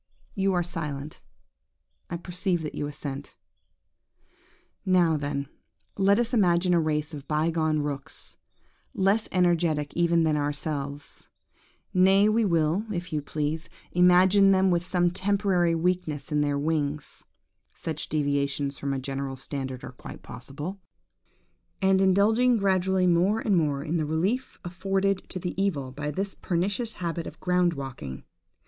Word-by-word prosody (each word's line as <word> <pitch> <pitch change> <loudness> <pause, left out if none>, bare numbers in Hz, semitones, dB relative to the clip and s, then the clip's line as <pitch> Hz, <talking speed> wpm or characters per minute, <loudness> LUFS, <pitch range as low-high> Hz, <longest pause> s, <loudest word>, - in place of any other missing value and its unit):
You 195 -1 +1
are 175 -1 +2
silent: 155 -4 -5 0.9
I 170 - -3
perceive 175 0 -2
that 150 - -5
you 145 - -3
assent. 145 -1 -7 1.5
"Now, 180 -4 +3
then, 145 -1 -2 0.5
let 200 +1 +4
us 240 +1 0
imagine 180 -4 +3
a 170 - +4
race 155 0 -1
of 145 -2 -8
bygone 155 0 +1
rooks, 140 -2 -6 0.6
less 195 +3 +2
energetic 170 -5 +1
even 170 -1 +3
than 155 -1 +2
ourselves; 145 -1 -4 0.6
nay, 190 +2 +5
we 220 +1 +3
will, 170 +1 +2
if 175 -3 -4
you 150 - 0
please, 150 +2 -3 0.2
imagine 185 +3 +5
them 190 -1 +4
with 175 0 +1
some 175 -1 +1
temporary 190 -2 +1
weakness 165 -3 -1
in 150 0 +2
their 145 -1 +1
wings 150 -1 -2 0.5
(such 155 -2 -5
deviations 140 -1 -1
from 140 -1 -2
a - - -2
general 135 0 -4
standard 130 -1 -5
are - - -7
quite 125 - -11
possible), 150 +10 -6 1.0
and 190 0 +3
indulging 220 +6 +4
gradually 190 -2 +2
more 180 +5 +3
and 210 -3 +1
more 145 -5 +1
in 160 +2 -1
the 155 - 0
relief 190 - -1
afforded 195 +2 -1
to - - -5
the 180 -1 -3
evil 145 -10 -1
by 145 +3 -4
this 195 +6 -3
pernicious 200 +6 -1
habit 170 -1 -3
of - - -10
ground 180 -1 +2
walking. 130 - -7
170 Hz, 140 wpm, -27 LUFS, 145-190 Hz, 1.5 s, nay